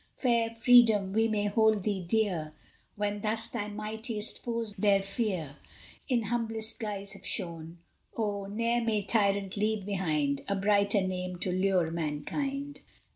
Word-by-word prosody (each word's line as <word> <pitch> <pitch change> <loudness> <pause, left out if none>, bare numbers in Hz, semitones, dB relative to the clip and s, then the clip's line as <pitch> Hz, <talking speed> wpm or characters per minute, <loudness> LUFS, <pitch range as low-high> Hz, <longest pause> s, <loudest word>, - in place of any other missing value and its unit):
Fair 235 -3 +2
Freedom! 225 -4 +5
we 225 +1 +3
may 210 -2 0
hold 215 -1 +3
thee 200 -2 -1
dear, 175 -5 0 0.4
When 205 0 -2
thus 220 +1 +1
thy 210 -3 -3
mightiest 215 +1 -3
foes 230 -3 -3
their 195 -1 +3
fear 190 - -3 0.5
In 245 -4 +1
humblest 225 0 -1
guise 200 -3 -4
have 195 -1 -13
shown. 170 -3 -4 0.4
Oh! 205 -3 -2
ne'er 230 +3 0
may 215 -3 0
tyrant 200 -2 +1
leave 210 -1 0
behind 155 -8 0
A 200 - 0
brighter 200 0 +3
name 185 -1 -3
to 180 - -2
lure 185 -3 +1
mankind! 275 - -3
205 Hz, 140 wpm, -29 LUFS, 190-225 Hz, 0.5 s, Freedom